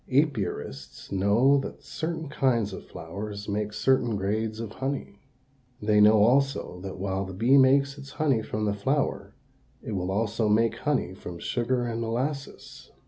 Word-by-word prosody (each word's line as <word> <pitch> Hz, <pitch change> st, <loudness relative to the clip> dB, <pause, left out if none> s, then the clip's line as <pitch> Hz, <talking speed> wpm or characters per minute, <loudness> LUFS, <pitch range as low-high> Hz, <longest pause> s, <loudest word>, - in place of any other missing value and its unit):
Apiarists 110 Hz, -, -1 dB
know 105 Hz, +9 st, +4 dB
that 135 Hz, -, -7 dB
certain 160 Hz, +2 st, -4 dB
kinds 130 Hz, -7 st, +1 dB
of -, -, -9 dB
flowers 100 Hz, +5 st, -7 dB
make 105 Hz, 0 st, -2 dB
certain 120 Hz, +1 st, +2 dB
grades 110 Hz, +3 st, -2 dB
of 115 Hz, -2 st, -5 dB
honey. 135 Hz, -5 st, -4 dB, 0.6 s
They 105 Hz, 0 st, +3 dB
know 105 Hz, 0 st, +7 dB
also 135 Hz, -6 st, +2 dB
that 95 Hz, -1 st, -6 dB
while 95 Hz, 0 st, -2 dB
the 95 Hz, -1 st, -7 dB
bee 120 Hz, +8 st, +4 dB
makes 140 Hz, +1 st, +4 dB
its 140 Hz, 0 st, -10 dB
honey 140 Hz, -7 st, +1 dB
from 105 Hz, 0 st, -3 dB
the 105 Hz, -, +1 dB
flower, 135 Hz, +8 st, -1 dB, 0.5 s
it -, -, -5 dB
will 95 Hz, -2 st, -2 dB
also 110 Hz, +2 st, 0 dB
make 115 Hz, +2 st, +3 dB
honey 145 Hz, -10 st, -1 dB
from 90 Hz, -2 st, -8 dB
sugar 120 Hz, +6 st, -1 dB
and 115 Hz, -1 st, -3 dB
molasses. 130 Hz, +5 st, -4 dB
115 Hz, 155 wpm, -27 LUFS, 100-135 Hz, 0.6 s, know